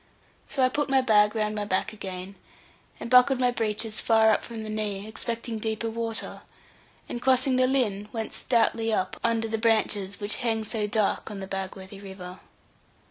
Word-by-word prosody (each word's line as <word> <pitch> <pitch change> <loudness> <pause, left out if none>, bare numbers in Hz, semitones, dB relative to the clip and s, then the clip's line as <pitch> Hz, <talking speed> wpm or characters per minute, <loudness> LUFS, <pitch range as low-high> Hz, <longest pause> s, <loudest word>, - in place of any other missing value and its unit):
So 265 - +1
I 255 - +5
put 290 +3 -1
the 270 -1 +3
bag 210 -2 +4
round 215 -1 0
my 210 -1 -2
back 205 +2 -1
again, 190 -2 -6 0.7
and - - -5
buckled 250 +2 +5
my 250 -1 +3
breeches 220 -1 -2
far 220 -1 +4
up 215 - +1
from 230 -2 -6
the 215 - -6
knee, 210 -1 -2
expecting 230 +1 -4
deeper 220 +1 -2
water, 225 0 -3 0.7
and 240 - -5
crossing 260 0 +4
the 255 0 +4
Lynn, 210 -6 0
went 225 -2 -4
stoutly 225 -2 +1
up 185 -3 -1
under 230 -1 +1
the 225 0 -2
branches 210 -3 +1
which 205 0 0
hang 225 -3 0
so 215 -1 -1
dark 210 0 0
on 205 -2 -6
the 190 - -5
Bagworthy 190 0 -6
river. 190 -2 -9
220 Hz, 180 wpm, -26 LUFS, 205-235 Hz, 0.7 s, I